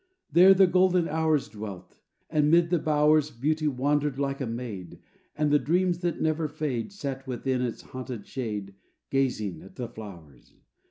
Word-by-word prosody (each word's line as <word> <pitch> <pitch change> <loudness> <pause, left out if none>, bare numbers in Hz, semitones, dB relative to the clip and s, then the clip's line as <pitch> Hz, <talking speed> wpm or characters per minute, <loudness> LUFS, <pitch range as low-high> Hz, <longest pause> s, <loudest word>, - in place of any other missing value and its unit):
There 185 +3 +7
the 190 0 +7
golden 180 -1 +3
Hours 155 -2 +1
Dwelt; 105 -3 -9 0.3
and 150 -2 +2
'mid 170 +1 +4
the 175 - +3
bowers 150 0 +3
Beauty 155 +5 -1
wandered 145 +1 0
like 140 0 -2
a 130 - -1
maid; 115 -7 -6 0.4
And 150 -1 +1
the 150 - +5
Dreams 175 +5 +1
that 175 -2 -2
never 155 0 0
fade 145 - -3
Sat 135 -8 -6
within 130 0 -1
its 120 -2 -3
haunted 125 -5 -7
shade 105 -6 -5 0.4
Gazing 110 -10 -1
at 95 - -14
the 125 - -4
flowers. 85 - -12
140 Hz, 160 wpm, -27 LUFS, 115-155 Hz, 0.4 s, There